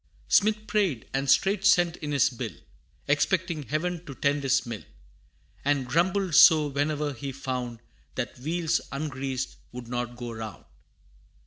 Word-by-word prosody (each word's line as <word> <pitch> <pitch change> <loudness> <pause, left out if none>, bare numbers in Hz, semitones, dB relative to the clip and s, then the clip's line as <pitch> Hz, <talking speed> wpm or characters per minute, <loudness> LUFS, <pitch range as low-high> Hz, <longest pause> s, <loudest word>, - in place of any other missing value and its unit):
Smith 215 +1 +3
prayed, 195 - 0
and 135 0 -1
straight 195 +7 +3
sent 175 -4 +4
in 150 -1 -5
his 140 -1 +3
bill, 120 - -5 0.5
Expecting 160 +3 +1
Heaven 165 +5 -2
to 140 - -7
tend 145 +1 +1
his 135 -1 +2
mill; 115 -3 -5 0.8
And 140 -2 +1
grumbled 180 +6 +1
sore, 150 -1 +7
whene'er 145 +1 -1
he 135 +2 -5
found 125 -3 -4 0.3
That 125 -1 -4
wheels 165 +3 0
ungreased 135 -2 -3
would 125 -1 -8
not 120 0 -3
go 120 -1 -6
round. 110 -2 -7
145 Hz, 140 wpm, -27 LUFS, 130-170 Hz, 0.8 s, sore